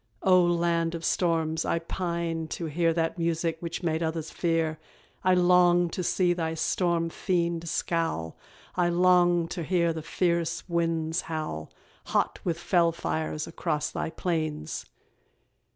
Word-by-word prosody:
O 185 -1 +6
land 170 -1 +1
of 165 -1 -5
storms, 165 -2 +1
I - - 0
pine 170 -1 -3
to 170 - -4
hear 165 +2 +1
That 165 +1 -1
music 165 0 0
which 170 +1 -5
made 160 -1 0
others 160 -1 -2
fear; 165 -2 0 0.4
I 185 0 +4
long 175 -1 +4
to 185 - -3
see 180 0 +2
thy 165 -2 -2
storm 170 0 0
fiend 170 -2 -1
scowl, 165 - -1 0.4
I 175 -1 +2
long 175 -1 +4
to 180 - -4
hear 170 0 +1
the 160 - -5
fierce 170 0 -1
winds 165 -1 0
howl, 155 - -4 0.4
Hot - - 0
with 170 -2 -1
fell 170 -1 +2
fires, 160 -2 -3
across 165 -2 -2
thy - - -3
plains. 160 - -3
170 Hz, 140 wpm, -27 LUFS, 160-175 Hz, 0.4 s, O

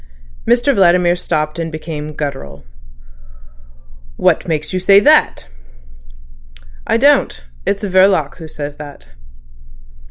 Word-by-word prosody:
Mr 240 +4 +2
Vladimir 180 -4 +3
stopped, 155 -2 -3
and 165 -1 -4
became 155 -1 -7
guttural. 135 - -6 1.5
"What - - +1
makes 155 -1 -3
you 185 - -1
say 195 +2 +5
that?" 300 - +2 1.4
"I - - +2
don't. 280 - +2 0.2
It's 200 +1 -1
Verloc 185 -6 +2
who 165 -3 -10
says 145 -1 -7
that." 145 - -12
165 Hz, 105 wpm, -16 LUFS, 150-195 Hz, 1.5 s, say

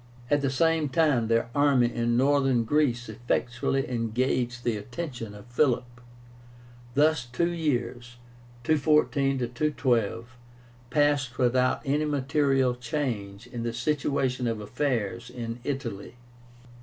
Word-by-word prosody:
At 145 0 +3
the 140 - +1
same 160 +2 +2
time 140 -7 +2
their 115 +1 +1
army 140 -4 +3
in 120 0 +1
Northern 135 -2 +3
Greece 125 -1 +1
effectually 120 +4 -1
engaged 120 +1 -1
the 120 -2 0
attention 120 -1 -6
of 105 - -12
Philip. 125 -1 0 0.9
Thus 150 -2 +3
two 170 +9 -1
years 125 -7 -2 0.5
(214 145 -2 +2 0.2
212) 120 -5 0 0.5
passed 145 -2 +1
without 125 0 +2
any 145 +3 +1
material 140 -2 +1
change 115 -5 -4
in 120 -1 -6
the 115 0 -2
situation 130 -1 0
of 115 -2 -1
affairs 115 0 -2
in 115 -1 -6
Italy. 125 -6 -4
125 Hz, 115 wpm, -27 LUFS, 120-145 Hz, 0.9 s, At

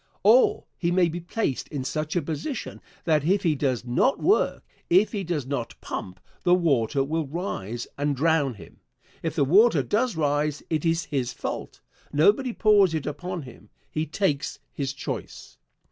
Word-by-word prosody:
Or 225 +6 +5
he 170 - +1
may 175 -1 +3
be 170 +2 -4
placed 175 - -2
in 140 -4 -4
such 155 +4 -3
a 175 - +1
position 160 - -5 0.2
that 155 -3 +2
if 190 +5 +2
he 165 - +3
does 130 -4 -1
not 125 - +2
work 405 +4 +2 0.3
if 190 +5 +4
he 205 -3 -3
does 160 -6 -2
not 130 -4 -4
pump 90 -1 -6 0.2
the 180 -1 +4
water 140 -7 +2
will 155 +2 -2
rise 120 - -4
and 145 0 +1
drown 145 -3 +2
him. - - -14 0.4
If 165 -1 -3
the 145 -4 +3
water 210 - +5
does 230 +1 0
rise 150 -1 0
it 155 0 0
is 165 -1 +1
his 135 -5 -2
fault. - - -6 0.3
Nobody 205 - +3
pours 205 -6 +4
it 155 - -2
upon 170 +3 -4
him. 115 -5 -13 0.2
He 155 +1 -2
takes 150 -3 -1 0.2
his 135 -2 -2
choice. 140 - -7
155 Hz, 170 wpm, -25 LUFS, 140-180 Hz, 0.4 s, Or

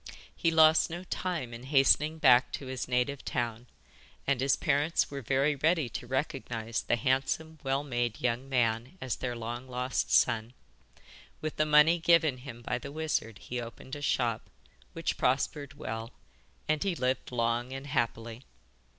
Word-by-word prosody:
He 165 - +1
lost 160 -1 +5
no 175 +2 -6
time 175 -9 -3
in 115 - -8
hastening 145 +3 +4
back 125 -4 +5
to 140 - -5
his 130 0 -4
native 125 +2 0
town, 120 0 -3 0.6
and 135 -2 +1
his 135 +1 +3
parents 150 +3 +1
were 140 -1 -5
very 135 +4 +1
ready 155 -1 +1
to 120 - -6
recognise 120 -4 -2
the - - +1
handsome, 135 +6 -1
well 135 +1 0
made 120 -5 -2
young 125 +2 -1
man 120 +4 0
as 130 -7 -3
their 125 -2 -3
long 120 +2 -5
lost 125 +1 -2
son. 115 -1 +3 0.9
With 155 0 -4
the 155 - +2
money 150 +3 +6
given 160 -5 +4
him 120 -2 -10
by 125 +1 -2
the 140 +1 -8
wizard 145 -8 -2
he 125 +3 -5
opened 120 +3 -8
a 145 - -8
shop, 120 -5 0 0.4
which 165 0 -2
prospered 140 +2 0
well, 115 -3 -5 0.5
and 155 0 +1
he 195 -3 0
lived 130 -3 -1
long 120 +1 0
and 135 +1 -6
happily. 115 -3 -2
130 Hz, 160 wpm, -30 LUFS, 120-150 Hz, 0.9 s, money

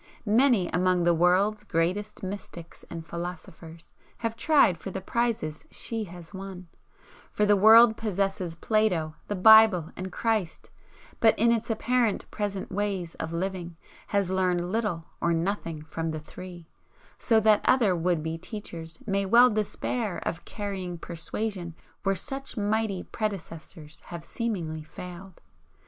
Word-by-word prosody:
Many 225 -3 +4
among 180 0 +2
the 175 0 +4
world's 185 +5 +2
greatest 185 +7 -1
mystics 185 -3 -8
and 165 -1 -7
philosophers 170 0 -8 0.2
have 230 -1 -3
tried 230 - +4
for 195 - -6
the 190 - -4
prizes 215 -7 -2
she 225 -2 -4
has 175 -1 -12
won, 190 -2 -8 0.6
for 210 - +1
the 205 0 +5
world 220 +3 +7
possesses 195 -4 -2
Plato, 180 -5 +1
the 205 - -2
Bible 215 -4 +7
and 185 +1 -6
Christ, 215 -5 -2 0.5
but 225 -1 +4
in 235 +2 +4
its 230 0 0
apparent 230 -1 +1
present 200 -2 -3
ways 195 -4 -2
of 160 - -4
living 175 -1 -4 0.3
has 200 -3 0
learned 180 -1 0
little 210 -7 -1 0.2
or 170 - +2
nothing 165 -3 -2
from 165 +1 -4
the 155 -1 -3
three, 175 +2 -11 0.5
so 225 -2 +4
that 215 -1 +4
other 225 -8 +4
would 170 -2 0
be 160 +1 -3
teachers 170 -5 -8
may 200 -2 0
well 240 +4 +7
despair 215 0 -2
of 165 - -4
carrying 195 -4 -5
persuasion 170 +1 -4 0.3
where 195 -1 +1
such 270 +6 -4
mighty 210 -2 0
predecessors 165 -6 -6
have 170 -2 -8
seemingly 170 -8 -3
failed. 180 +4 -10
190 Hz, 140 wpm, -27 LUFS, 170-215 Hz, 0.6 s, world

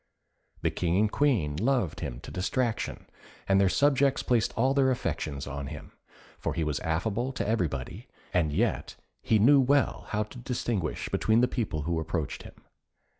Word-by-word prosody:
The - - +2
King 85 0 0
and 105 +1 +2
Queen 110 - +1
loved 115 - 0
him - - -5
to - - -9
distraction, 115 +5 -2 0.4
and 95 0 +4
their 95 - +4
subjects 140 +2 +3
placed 120 -4 +2
all 130 +4 +3
their 135 -1 +3
affections 75 - -2
on 70 0 -5
him, 75 0 -9 0.5
for - - -2
he 85 - 0
was 75 -2 -1
affable 110 +10 -1
to 130 - -2
everybody, 85 - -2 0.3
and 85 -4 +2
yet - - -1 0.3
he 110 - +3
knew 135 +7 +6
well 135 0 +2
how 105 0 0
to 115 +4 -11
distinguish 120 - -2
between 110 +1 +2
the 125 - +4
people 100 - -2
who 85 +1 -1
approached 80 -2 -3
him. - - -12
105 Hz, 170 wpm, -28 LUFS, 80-125 Hz, 0.5 s, knew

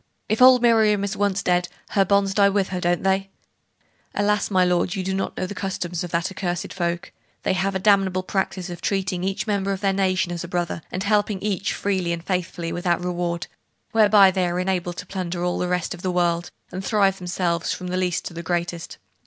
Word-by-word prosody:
If 220 +3 0
old 255 -1 +8
Miriam 220 -3 +4
is 200 +1 -2
once 200 -1 0
dead, 180 0 +2 0.2
her 195 - +3
bonds 195 0 +2
die 200 0 +5
with 200 -1 0
her, 180 -1 -3
don't 175 0 +1
they?' 195 0 +1 0.9
'Alas, 205 0 +1
my 185 -3 +3
lord, 180 +2 +1
you 190 - -2
do 190 +1 -2
not 195 - -3
know - - -1
the 185 - -5
customs 180 -3 -3
of 175 - -5
that 170 +3 -1
accursed 180 -3 -3
folk. 175 -1 -2 0.3
They - - +1
have 190 +1 0
a - - +3
damnable 190 -2 +3
practice 190 -1 -2
of 175 - -8
treating 190 -2 -1
every 195 +3 -1
member 200 -2 0
of 195 0 -3
their 195 -1 +2
nation 190 -1 +1
as 175 0 -4
a - - -6
brother, 175 -1 -2
and 185 - -3
helping 205 -1 +1
each 200 -2 -1
freely 185 -4 -1
and 170 -1 -5
faithfully 175 -2 -2
without 175 0 0
reward; 175 -1 -2 0.5
whereby 205 -3 +6
they 185 -1 0
are 175 +1 -1
enabled 180 -2 -1
to - - -6
plunder 180 -2 -4
all 180 - -1
the 180 - 0
rest 180 -1 -1
of 175 - -10
the 185 - -1
world, 175 -1 +1 0.2
and 185 +1 -5
thrive 195 -2 +2
themselves, 175 -2 -1
from 180 -1 -4
the 180 - -2
least 180 -2 -1
to - - -6
the 170 - -5
greatest. 170 0 -3
185 Hz, 220 wpm, -23 LUFS, 175-195 Hz, 0.9 s, old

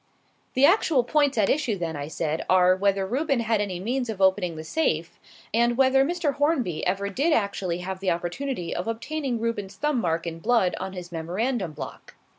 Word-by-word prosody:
"The 265 - +6
actual 320 - +4
points 285 +1 +2
at 205 -3 +3
issue, 255 -8 +1
then," 165 -3 -3
I 145 0 -4
said, 160 0 -2
"are, 185 0 +5
whether 195 0 +1
Reuben 270 +4 0
had 225 -2 +1
any 190 -4 -3
means 245 +5 -2
of 215 -3 -4
opening 190 -3 +2
the 155 - -6
safe, 165 - -1 0.3
and 235 +1 +2
whether 270 0 +5
Mr. 330 -1 0
Hornby 280 - 0
ever 195 +2 0
did 280 - +1
actually 200 - 0
have 190 +1 -5
the 190 -1 -1
opportunity 175 +3 -3
of 180 - -3
obtaining 245 +2 -2
Reuben's 205 -4 -3
thumb 295 -2 0
mark 165 -2 -1
in 165 -1 -5
blood 220 -1 +2
on 190 0 -5
his 180 -1 -8
memorandum 180 +3 -2
block." - - -9
205 Hz, 190 wpm, -25 LUFS, 180-265 Hz, 0.3 s, The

